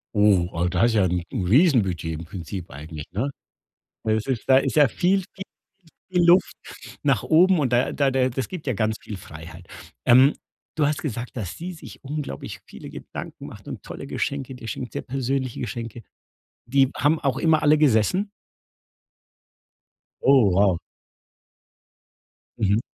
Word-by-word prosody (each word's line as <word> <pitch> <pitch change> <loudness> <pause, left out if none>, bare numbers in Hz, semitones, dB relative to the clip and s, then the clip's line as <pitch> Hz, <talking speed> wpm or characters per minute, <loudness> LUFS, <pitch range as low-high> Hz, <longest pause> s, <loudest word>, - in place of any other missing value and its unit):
Oh, 100 -4 +4
ah, 85 +1 0
das 115 - +2
ist 120 - +2
ja 100 -3 +4
'n 90 -1 -1
'n 90 - -2
Riesenbudget 100 - +3
im 85 - -8
Prinzip 90 +1 -7
eigentlich, 75 +1 -8
ne? 115 +9 -1 0.7
Das 110 0 0
ist 130 -5 -2
da 130 -1 +7
ist 135 - 0
ja 145 -3 +6
viel 190 +2 +1
viel 190 - -7 0.7
viel 180 -2 +2
Luft 175 +2 +5 0.5
nach 135 -8 +2
oben 180 +2 +4
und 130 -4 0
da 120 +2 +2
da 140 -2 +1
da 130 -1 +2
das 130 -1 -3
gibt 175 -5 -8
ja 130 - +1
ganz 110 +1 0
viel 105 - -7
Freiheit. 85 +1 -11 0.4
Ähm, 130 +4 +6 0.4
du 155 - +2
hast 150 0 0
gesagt, 125 -4 -5
dass 95 -5 -5
sie 180 +2 -6
sich 160 - -12
unglaublich 140 - -5
viele - - -11
Gedanken - - -8
macht - - -12
und - - -7
tolle - - -8
Geschenke 135 -2 -3
dir 120 -3 -10
schenkt, 125 +2 -5
sehr - - -3
persönliche 130 -1 -2
Geschenke. 115 0 -6 0.6
Die 135 +2 +3
haben 150 +4 +2
auch 135 -4 0
immer 160 -2 +3
alle 150 +1 +5
gesessen? 150 - +2 1.9
Oh 130 -6 +6
wow. 95 -1 +3 1.8
Mhm. 105 0 +2
125 Hz, 160 wpm, -24 LUFS, 100-145 Hz, 1.9 s, da